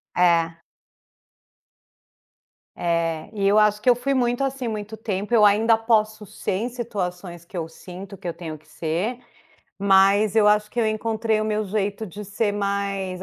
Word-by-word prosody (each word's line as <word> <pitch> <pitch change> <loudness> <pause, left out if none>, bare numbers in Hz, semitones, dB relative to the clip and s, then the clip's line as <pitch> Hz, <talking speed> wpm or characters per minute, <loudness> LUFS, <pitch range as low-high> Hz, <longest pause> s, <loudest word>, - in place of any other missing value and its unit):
É. 170 -2 +3 2.2
É, 165 -2 -1
e 200 -3 0
eu 205 - +4
acho 210 0 +3
que 250 - +3
eu 245 - +6
fui 260 +3 -1
muito, 245 0 +1
assim, 270 -2 -2
muito 215 0 -5
tempo, 210 +1 -3
eu 215 -2 +6
ainda 220 +2 +4
posso 215 -2 +1
ser - - -5
em 200 +5 -1
situações 180 -7 -5
que 180 - -14
eu 165 -1 -3
sinto 185 +4 -10
que 180 - -8
eu 170 - -2
tenho 165 -2 -7
que 155 +1 -26
ser, 170 +10 -2 0.6
mas 200 +2 +4
eu 210 -1 +5
acho 210 0 +3
que 245 - -7
eu 225 - +3
encontrei 220 0 0
o - - -1
meu 215 0 -1
jeito 205 +2 -2
de 205 +3 -8
ser 205 +1 -1
mais 200 -2 -2
205 Hz, 170 wpm, -23 LUFS, 185-220 Hz, 2.2 s, eu